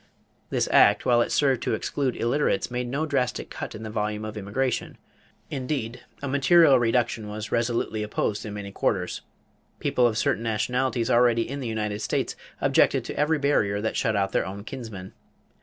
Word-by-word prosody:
This -, -, 0 dB
act, -, -, +5 dB
while 120 Hz, -1 st, +4 dB
it -, -, -1 dB
served 135 Hz, -4 st, +2 dB
to -, -, 0 dB
exclude 135 Hz, -3 st, -2 dB
illiterates, 120 Hz, -2 st, 0 dB
made 125 Hz, 0 st, -2 dB
no 140 Hz, +6 st, -1 dB
drastic 130 Hz, -5 st, -1 dB
cut -, -, -6 dB
in 110 Hz, -, -8 dB
the 110 Hz, -, -6 dB
volume 105 Hz, 0 st, -2 dB
of 110 Hz, -, -6 dB
immigration. 110 Hz, +5 st, -2 dB, 0.5 s
Indeed 125 Hz, -4 st, -3 dB, 0.2 s
a -, -, -2 dB
material 140 Hz, +1 st, +5 dB
reduction 115 Hz, -2 st, 0 dB
was 105 Hz, +1 st, -6 dB
resolutely 115 Hz, -2 st, 0 dB
opposed 105 Hz, -1 st, -2 dB
in 105 Hz, -2 st, -6 dB
many 100 Hz, -1 st, -6 dB
quarters. 90 Hz, -2 st, -1 dB, 0.6 s
People 125 Hz, -1 st, +2 dB
of 110 Hz, -2 st, -2 dB
certain 110 Hz, -, +1 dB
nationalities 115 Hz, +2 st, 0 dB
already 120 Hz, -1 st, +4 dB
in 140 Hz, +2 st, -5 dB
the 130 Hz, -, -4 dB
United 105 Hz, -2 st, -2 dB
States -, -, -1 dB, 0.3 s
objected -, -, +3 dB
to -, -, -5 dB
every 150 Hz, +2 st, +2 dB
barrier 125 Hz, -9 st, +1 dB
that 110 Hz, +2 st, -2 dB
shut 110 Hz, -4 st, +1 dB
out 100 Hz, -1 st, +1 dB
their -, -, +1 dB
own 100 Hz, +2 st, -7 dB
kinsmen. 110 Hz, -7 st, -8 dB
115 Hz, 175 wpm, -25 LUFS, 105-130 Hz, 0.6 s, act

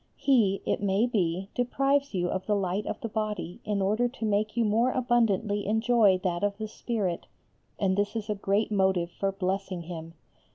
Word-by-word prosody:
He, 220 Hz, -8 st, +2 dB
it -, -, 0 dB
may 200 Hz, +2 st, +2 dB
be, 190 Hz, -5 st, -1 dB
deprives 275 Hz, +1 st, +1 dB
you 175 Hz, -1 st, +1 dB
of 190 Hz, -, -3 dB
the 210 Hz, -, +2 dB
light 195 Hz, +1 st, -1 dB
of -, -, -3 dB
the 230 Hz, -, -2 dB
body 210 Hz, -5 st, -3 dB
in 205 Hz, -2 st, -1 dB
order 215 Hz, +5 st, +2 dB
to 240 Hz, -2 st, -5 dB
make 215 Hz, +1 st, 0 dB
you 235 Hz, -, +3 dB
more 225 Hz, +4 st, +3 dB
abundantly 225 Hz, -5 st, +1 dB
enjoy 220 Hz, -2 st, +4 dB
that 175 Hz, 0 st, -1 dB
of 200 Hz, 0 st, 0 dB
the 215 Hz, 0 st, -4 dB
spirit, 210 Hz, -5 st, -3 dB, 0.5 s
and 190 Hz, -2 st, +1 dB
this 205 Hz, +2 st, -1 dB
is 215 Hz, -2 st, -3 dB
a 210 Hz, -, 0 dB
great 200 Hz, +2 st, 0 dB
motive 190 Hz, -4 st, +1 dB
for 195 Hz, +2 st, -1 dB
blessing 190 Hz, -1 st, -3 dB
Him. 165 Hz, -1 st, -8 dB
205 Hz, 190 wpm, -28 LUFS, 190-225 Hz, 0.5 s, enjoy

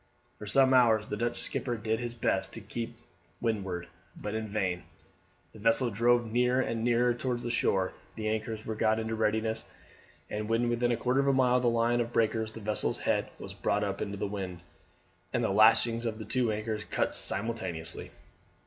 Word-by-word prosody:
For 105 Hz, -, -8 dB
some 130 Hz, +4 st, +5 dB
hours 115 Hz, -4 st, +5 dB
the 105 Hz, -, -4 dB
Dutch 120 Hz, +2 st, -1 dB
skipper 120 Hz, -2 st, -1 dB
did 110 Hz, +1 st, -1 dB
his 120 Hz, -1 st, -4 dB
best 95 Hz, -4 st, 0 dB
to 115 Hz, -, -7 dB
beat 115 Hz, +3 st, -6 dB
to 120 Hz, -, -26 dB, 0.4 s
windward, 95 Hz, -7 st, -2 dB, 0.3 s
but 105 Hz, -, -5 dB
in 110 Hz, 0 st, -3 dB
vain, 95 Hz, -4 st, -1 dB, 0.7 s
the 110 Hz, -, -12 dB
vessel 115 Hz, +3 st, +3 dB
drove 120 Hz, +3 st, +3 dB
nearer 125 Hz, +2 st, +2 dB
and 115 Hz, -3 st, -1 dB
nearer 120 Hz, 0 st, +3 dB
towards 120 Hz, 0 st, -3 dB
the 120 Hz, -, -2 dB
shore; 95 Hz, -5 st, +1 dB, 0.2 s
the 110 Hz, -1 st, -3 dB
anchors 110 Hz, 0 st, -3 dB
were 110 Hz, -, -2 dB
got 110 Hz, 0 st, +2 dB
in 110 Hz, 0 st, -2 dB
readiness, 110 Hz, 0 st, 0 dB, 0.6 s
and 105 Hz, +1 st, -4 dB
when 115 Hz, +1 st, +2 dB
within 120 Hz, +1 st, +1 dB
a 120 Hz, -, +1 dB
quarter 125 Hz, +2 st, +1 dB
of 140 Hz, -, +2 dB
a 140 Hz, -, +4 dB
mile 125 Hz, -1 st, +4 dB
of -, -, 0 dB
the 120 Hz, -, +3 dB
line 115 Hz, +1 st, +2 dB
of 120 Hz, 0 st, -3 dB
breakers 110 Hz, -1 st, +1 dB
the 115 Hz, -, -9 dB
vessel's 105 Hz, +1 st, 0 dB
head -, -, 0 dB
was -, -, -8 dB
brought 105 Hz, +1 st, 0 dB
up 100 Hz, -1 st, -3 dB
into 100 Hz, -1 st, -3 dB
the -, -, -2 dB
wind, 95 Hz, -3 st, -5 dB, 0.7 s
and -, -, +1 dB
the -, -, +1 dB
lashings 115 Hz, +3 st, +4 dB
of 110 Hz, -1 st, -3 dB
the 110 Hz, -, -7 dB
two 125 Hz, -3 st, +1 dB
anchors 110 Hz, 0 st, -3 dB
cut -, -, 0 dB
simultaneously. 95 Hz, -7 st, 0 dB
110 Hz, 200 wpm, -30 LUFS, 105-120 Hz, 0.7 s, some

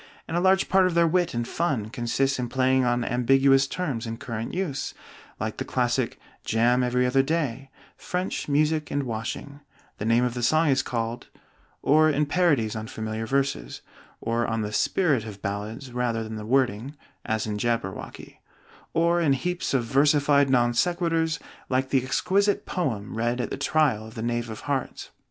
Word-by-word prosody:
and -, -, -4 dB
a -, -, +3 dB
large 190 Hz, +1 st, +3 dB
part 190 Hz, -1 st, +4 dB
of 175 Hz, -, -2 dB
their 170 Hz, 0 st, +5 dB
wit 175 Hz, -2 st, +1 dB
and 120 Hz, 0 st, -2 dB
fun 140 Hz, -11 st, -1 dB
consists 130 Hz, +2 st, 0 dB
in 120 Hz, -1 st, -2 dB
plays 130 Hz, +1 st, +2 dB
on 120 Hz, 0 st, +1 dB
ambiguous 135 Hz, +2 st, +4 dB
terms 135 Hz, -8 st, -3 dB
in 115 Hz, 0 st, -4 dB
current 115 Hz, -3 st, -5 dB
use, 175 Hz, -7 st, -3 dB, 0.4 s
like 110 Hz, 0 st, -3 dB
the -, -, -2 dB
classic 125 Hz, 0 st, -1 dB, 0.2 s
"jam 120 Hz, +3 st, +2 dB
every 125 Hz, 0 st, +1 dB
other 125 Hz, +2 st, +3 dB
day," 135 Hz, -3 st, -2 dB, 0.3 s
"French, 180 Hz, +1 st, -3 dB
music, 150 Hz, +1 st, +1 dB
and 145 Hz, 0 st, -1 dB
washing," 120 Hz, +4 st, -5 dB, 0.4 s
"The 105 Hz, -, -3 dB
name 115 Hz, +2 st, +3 dB
of 125 Hz, -1 st, 0 dB
the 120 Hz, -, -4 dB
song 155 Hz, +6 st, +3 dB
is 135 Hz, -1 st, +3 dB
called 115 Hz, -2 st, -3 dB, 0.3 s
" -, -, -36 dB
or 155 Hz, +1 st, +6 dB
in 150 Hz, 0 st, +1 dB
parodies 145 Hz, -10 st, +2 dB
on 110 Hz, 0 st, -5 dB
familiar 110 Hz, 0 st, -4 dB
verses 135 Hz, -, -1 dB, 0.4 s
(or 115 Hz, +1 st, -1 dB
on 115 Hz, -1 st, -1 dB
the 105 Hz, 0 st, -4 dB
spirit 145 Hz, -, +2 dB
of 105 Hz, -3 st, -9 dB
ballads 110 Hz, +6 st, -4 dB
rather 120 Hz, -2 st, -1 dB
than 110 Hz, 0 st, -6 dB
the 105 Hz, 0 st, -6 dB
wording, 130 Hz, +1 st, +1 dB, 0.3 s
as 110 Hz, -1 st, -1 dB
in 105 Hz, -1 st, -3 dB
'Jabberwocky'), 115 Hz, -4 st, -4 dB, 0.5 s
or 170 Hz, +1 st, +3 dB
in 150 Hz, -5 st, +3 dB
heaps 180 Hz, +7 st, -2 dB
of 135 Hz, -3 st, +2 dB
versified 140 Hz, +2 st, +3 dB
non 120 Hz, -2 st, +3 dB
sequiturs, 165 Hz, +1 st, +1 dB, 0.3 s
like 130 Hz, +1 st, 0 dB
the 135 Hz, -2 st, +3 dB
exquisite 200 Hz, +9 st, +1 dB
"poem" 115 Hz, -, -3 dB
read 120 Hz, +2 st, 0 dB
at 120 Hz, -, -2 dB
the -, -, -1 dB
trial 135 Hz, -9 st, +1 dB
of 110 Hz, -, -13 dB
the 110 Hz, -, -4 dB
Knave 120 Hz, 0 st, -2 dB
of 110 Hz, -, -7 dB
Hearts. 140 Hz, -2 st, -3 dB
130 Hz, 180 wpm, -25 LUFS, 115-150 Hz, 0.5 s, or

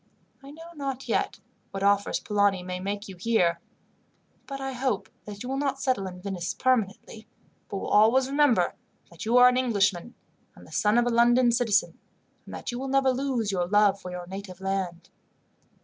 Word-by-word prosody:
I 275 Hz, -, -12 dB
know 325 Hz, +3 st, -12 dB
not 275 Hz, -4 st, -5 dB
yet -, -, -1 dB, 0.3 s
what 195 Hz, 0 st, -5 dB
offers 200 Hz, 0 st, +2 dB
Polani 205 Hz, -3 st, +1 dB
may 180 Hz, 0 st, -5 dB
make 200 Hz, +2 st, -4 dB
you 190 Hz, -, -9 dB
here, 180 Hz, -3 st, +1 dB, 0.9 s
but 275 Hz, -1 st, -6 dB
I 270 Hz, 0 st, -4 dB
hope 250 Hz, -5 st, -2 dB, 0.2 s
that 205 Hz, 0 st, -8 dB
you 250 Hz, -, -6 dB
will 270 Hz, +1 st, -2 dB
not 275 Hz, -1 st, -1 dB
settle 255 Hz, -8 st, 0 dB
in 180 Hz, -1 st, -9 dB
Venice 185 Hz, -3 st, -4 dB
permanently, 220 Hz, -3 st, -1 dB, 0.4 s
but 200 Hz, -, -4 dB
will -, -, -5 dB
always 230 Hz, +5 st, +4 dB
remember 275 Hz, -9 st, +2 dB, 0.4 s
that 170 Hz, -, -9 dB
you 235 Hz, +3 st, +3 dB
are 250 Hz, 0 st, +8 dB
an 250 Hz, 0 st, +3 dB
Englishman, 210 Hz, -4 st, 0 dB, 0.4 s
and -, -, -15 dB
the -, -, -17 dB
son 210 Hz, +2 st, +2 dB
of 240 Hz, -, +3 dB
a -, -, +1 dB
London 240 Hz, +1 st, +4 dB
citizen, 230 Hz, -3 st, +1 dB, 0.5 s
and -, -, -9 dB
that -, -, -5 dB
you 240 Hz, -, -5 dB
will 270 Hz, -, -4 dB
never 270 Hz, 0 st, +3 dB
lose 255 Hz, -5 st, -1 dB
your 180 Hz, -2 st, -1 dB
love 200 Hz, 0 st, +3 dB
for 180 Hz, -, -7 dB
your 180 Hz, 0 st, -6 dB
native 190 Hz, 0 st, -8 dB
land. 190 Hz, -3 st, -4 dB
215 Hz, 190 wpm, -26 LUFS, 195-255 Hz, 0.9 s, are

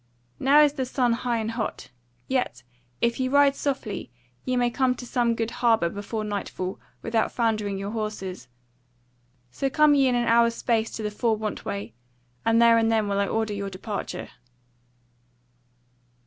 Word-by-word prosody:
now 285 Hz, +3 st, +6 dB
is 290 Hz, -1 st, +3 dB
the 265 Hz, -, -2 dB
sun 245 Hz, -2 st, +1 dB
high 240 Hz, 0 st, -1 dB
and 220 Hz, 0 st, -2 dB
hot; 225 Hz, -1 st, -4 dB, 0.4 s
yet 250 Hz, -, -1 dB, 0.4 s
if 235 Hz, +1 st, +1 dB
ye 260 Hz, -, +1 dB
ride 280 Hz, +1 st, +4 dB
softly 265 Hz, -, -3 dB, 0.3 s
ye 255 Hz, -, -1 dB
may 245 Hz, 0 st, +3 dB
come 255 Hz, 0 st, +1 dB
to 250 Hz, -, -8 dB
some 240 Hz, -1 st, +1 dB
good 225 Hz, 0 st, -2 dB
harbour 225 Hz, -8 st, +3 dB
before 205 Hz, +3 st, -4 dB
nightfall 200 Hz, -3 st, -4 dB, 0.2 s
without 225 Hz, -1 st, 0 dB
foundering 215 Hz, -4 st, 0 dB
your 200 Hz, +1 st, -4 dB
horses. 210 Hz, -, -5 dB, 1.0 s
So 270 Hz, -, -1 dB
come 300 Hz, +2 st, +5 dB
ye 275 Hz, -2 st, +4 dB
in 250 Hz, -, +2 dB
an 240 Hz, 0 st, +1 dB
hour's 235 Hz, 0 st, +4 dB
space 225 Hz, -2 st, 0 dB
to 220 Hz, -, -5 dB
the 210 Hz, -, -2 dB
Four 220 Hz, +1 st, 0 dB
want 215 Hz, -1 st, -4 dB
way, 100 Hz, +2 st, -4 dB, 0.5 s
and 225 Hz, 0 st, +3 dB
there 230 Hz, -1 st, +6 dB
and 225 Hz, 0 st, +2 dB
then 220 Hz, -2 st, +2 dB
will 200 Hz, 0 st, 0 dB
I 200 Hz, -, +1 dB
order 220 Hz, 0 st, -1 dB
your 200 Hz, -1 st, -3 dB
departure." 195 Hz, +2 st, -5 dB
230 Hz, 170 wpm, -25 LUFS, 210-245 Hz, 1.0 s, now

